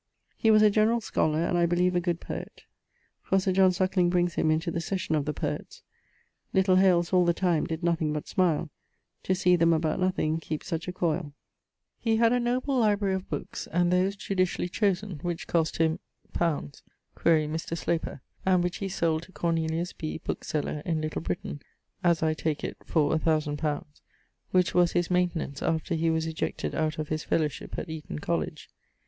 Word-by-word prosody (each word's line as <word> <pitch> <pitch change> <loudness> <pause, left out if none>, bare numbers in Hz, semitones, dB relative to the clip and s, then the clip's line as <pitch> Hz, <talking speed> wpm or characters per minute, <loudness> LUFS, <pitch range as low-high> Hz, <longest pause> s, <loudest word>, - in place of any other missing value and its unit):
He 225 - +2
was 215 -1 +6
a 210 - +6
generall 220 +3 +3
scolar, 160 -6 0
and - - 0
I 170 - +4
beleeve 180 +1 +2
a - - +4
good 175 -1 -1
poet: - - -7 0.6
for 195 - +1
Sir 190 0 0
John 185 0 +5
Suckling 185 -1 +2
brings 175 -1 +1
him 155 - +1
into 160 +2 +1
the 170 - -2
Session 185 -2 -2
of 150 -2 +1
the 150 - 0
Poets: - - -5 0.7
'Little 190 -1 +4
Hales 180 -2 +3
all 180 -1 +5
the 170 -1 +2
time 175 -4 +1
did 160 +1 -4
nothing 165 -3 +1
but 150 -1 -4
smile, 170 -5 +1 0.5
To 185 - 0
see 180 0 +4
them, 170 -1 +4
about 160 -1 0
nothing, 180 -4 +1
keepe 155 -1 -5
such 165 -1 -4
a - - -2
coile.' 170 -4 -1 0.7
He 225 -1 +1
had 230 +1 +4
a 245 - +2
noble 255 +3 0
librarie 205 -3 +2
of 190 0 -4
bookes, - - -5
and 175 +1 +1
those 185 +2 +2
judicially 185 -3 -1
chosen, 195 -2 -1
which 175 -2 -3
cost 165 -2 0
him... 160 0 +1 0.3
li. 165 -4 +1 0.5
(quaere 160 -2 +3
Mr. 160 +2 -3
Sloper); 165 -5 -2 0.2
and 185 -2 +3
which 180 0 -2
he 195 - -3
sold 165 -3 0
to 175 - -14
Cornelius 165 0 -1
Bee, 155 - -4
bookeseller, 150 0 -3
in 165 -3 -1
Little 155 0 -3
Britaine, 155 -3 -4 0.4
(as 170 -2 +3
I 160 0 +2
take 155 -1 -2
it, - - -4
for 150 -3 +2
1000 155 -2 0
li.) 150 -2 0 0.7
which 180 -1 +2
was 175 -1 +3
his 175 0 0
maintenance 175 -5 0
after 160 +1 -1
he 165 0 +1
was 160 0 +1
ejected 160 0 -3
out 155 -1 -1
of 155 -1 -4
his 155 0 -2
fellowship 150 -3 -2
at - - -4
Eaton 160 - -6
College. - - -3
170 Hz, 190 wpm, -28 LUFS, 160-185 Hz, 0.7 s, was